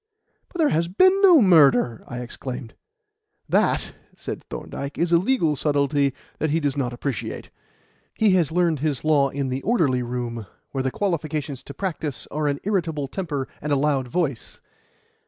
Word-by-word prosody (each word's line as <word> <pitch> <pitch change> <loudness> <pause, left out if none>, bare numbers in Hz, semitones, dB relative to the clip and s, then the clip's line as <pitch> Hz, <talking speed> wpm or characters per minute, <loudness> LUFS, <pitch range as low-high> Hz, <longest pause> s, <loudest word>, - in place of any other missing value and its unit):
"But - - -9
there 315 -3 +3
has 165 +2 +1
been 370 - +4
no 350 - +7
murder!" 140 - +4
I 125 0 -5
exclaimed. 125 -1 -7 0.7
"That," - - +1 0.3
said - - -6
Thorndyke, 140 0 -6
"is 170 0 0
a 170 - +6
legal 180 - +1
subtlety 140 -1 +1 0.2
that 155 - 0
he 160 +3 +1
does 145 -3 -1
not 130 -4 -1
appreciate. 125 0 -5 0.6
He 215 -2 +3
has 175 -6 +2
learned 170 -3 +1
his 145 -3 -1
law 145 -3 +4
in 140 -1 -3
the 130 +1 -2
orderly 155 - +2
room, 120 -3 -4 0.2
where 135 - -2
the 130 - 0
qualifications 155 -6 -2
to 140 - -9
practise 155 -6 -3
are 150 0 -1
an 140 0 -1
irritable 165 -8 -1
temper 145 -5 -3
and 150 - -3
a - - +4
loud 140 -2 +1
voice. 140 -4 -2
145 Hz, 165 wpm, -23 LUFS, 135-170 Hz, 0.7 s, no